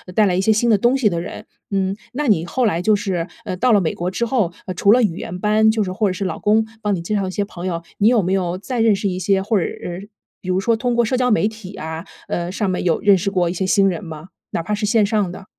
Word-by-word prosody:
带 215 Hz, -, +5 dB
来 185 Hz, -, +1 dB
一 185 Hz, -, +1 dB
些 220 Hz, -, +3 dB
新 220 Hz, +2 st, +2 dB
的 215 Hz, -, +5 dB
东 240 Hz, +6 st, +2 dB
西 225 Hz, -6 st, +3 dB
的 170 Hz, -, -2 dB
人。 180 Hz, -, -8 dB, 0.3 s
嗯， 195 Hz, 0 st, 0 dB, 0.2 s
那 290 Hz, +3 st, -2 dB
你 175 Hz, -7 st, +3 dB
后 250 Hz, +8 st, 0 dB
来 175 Hz, -6 st, +1 dB
就 210 Hz, +3 st, +3 dB
是， 185 Hz, -4 st, -2 dB, 0.2 s
呃， 185 Hz, -, -3 dB
到 250 Hz, +4 st, +2 dB
了 210 Hz, -, +5 dB
美 165 Hz, -, -1 dB
国 175 Hz, +1 st, -3 dB
之 235 Hz, +5 st, -1 dB
后， 225 Hz, -7 st, 0 dB
呃， 185 Hz, -, -4 dB
除 200 Hz, +3 st, +3 dB
了 245 Hz, +2 st, +5 dB
语 175 Hz, -6 st, 0 dB
言 180 Hz, +1 st, -6 dB
班， 215 Hz, +2 st, +3 dB
就 220 Hz, -1 st, +1 dB
是 185 Hz, -, -4 dB
或 200 Hz, +1 st, 0 dB
者 -, -, -2 dB
是 195 Hz, +1 st, -4 dB
老 185 Hz, -, -3 dB
公 215 Hz, +1 st, +3 dB, 0.2 s
帮 205 Hz, -2 st, 0 dB
你 170 Hz, -, -4 dB
介 190 Hz, +6 st, -2 dB
绍 195 Hz, -2 st, 0 dB
一 -, -, -4 dB
些 200 Hz, +2 st, -1 dB
朋 180 Hz, -2 st, -7 dB
友， 170 Hz, -2 st, -3 dB, 0.2 s
你 205 Hz, -, +4 dB
有 230 Hz, -5 st, +4 dB
没 185 Hz, +2 st, 0 dB
有 180 Hz, -2 st, -1 dB
再 245 Hz, +5 st, -4 dB
认 225 Hz, -2 st, +4 dB
识 200 Hz, -, -2 dB
一 185 Hz, -1 st, -2 dB
些 195 Hz, +1 st, +2 dB
或 210 Hz, 0 st, +1 dB
者 -, -, 0 dB
是 185 Hz, +4 st, -7 dB, 0.3 s
比 185 Hz, -, -7 dB
如 185 Hz, +1 st, +2 dB
说 230 Hz, +3 st, +2 dB
通 240 Hz, +1 st, -1 dB
过 235 Hz, -, +3 dB
社 240 Hz, -, 0 dB
交 250 Hz, 0 st, +2 dB
媒 215 Hz, -2 st, +3 dB
体 215 Hz, -3 st, -9 dB
啊， 160 Hz, 0 st, -6 dB, 0.2 s
呃， 175 Hz, 0 st, -2 dB
上 205 Hz, +1 st, -1 dB
面 185 Hz, -1 st, -1 dB
有 170 Hz, -, +1 dB
认 205 Hz, -1 st, +6 dB
识 190 Hz, +1 st, -1 dB
过 180 Hz, -3 st, +1 dB
一 170 Hz, -, -2 dB
些 185 Hz, +1 st, -2 dB
新 195 Hz, 0 st, +4 dB
人 175 Hz, -4 st, -2 dB
吗？ 160 Hz, 0 st, -9 dB, 0.2 s
哪 165 Hz, -, -2 dB
怕 210 Hz, +5 st, -3 dB
是 210 Hz, 0 st, -1 dB
线 215 Hz, 0 st, +3 dB
上 205 Hz, -3 st, 0 dB
的。 190 Hz, +1 st, -10 dB
195 Hz, 325 characters per minute, -20 LUFS, 180-220 Hz, 0.3 s, 认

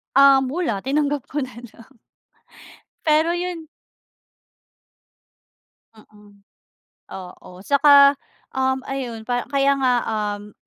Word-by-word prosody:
Um, 270 Hz, -1 st, +6 dB
wala. 275 Hz, -, -2 dB
Tinanggap 285 Hz, +2 st, -2 dB
ko 290 Hz, -1 st, -3 dB
na 250 Hz, -2 st, -10 dB
lang. 235 Hz, +1 st, -15 dB, 1.1 s
Pero 315 Hz, +2 st, +2 dB
yun 350 Hz, -2 st, -4 dB, 2.3 s
Mm. 210 Hz, -2 st, -21 dB, 0.7 s
Oo. 180 Hz, -1 st, -11 dB
Saka, 280 Hz, 0 st, +6 dB, 0.4 s
um, 265 Hz, 0 st, 0 dB
ayun 240 Hz, -5 st, -6 dB
pa 245 Hz, -1 st, -2 dB
kaya 280 Hz, 0 st, +2 dB
nga, 255 Hz, -2 st, +2 dB
um, 210 Hz, -1 st, -4 dB
265 Hz, 95 wpm, -21 LUFS, 220-285 Hz, 2.3 s, Um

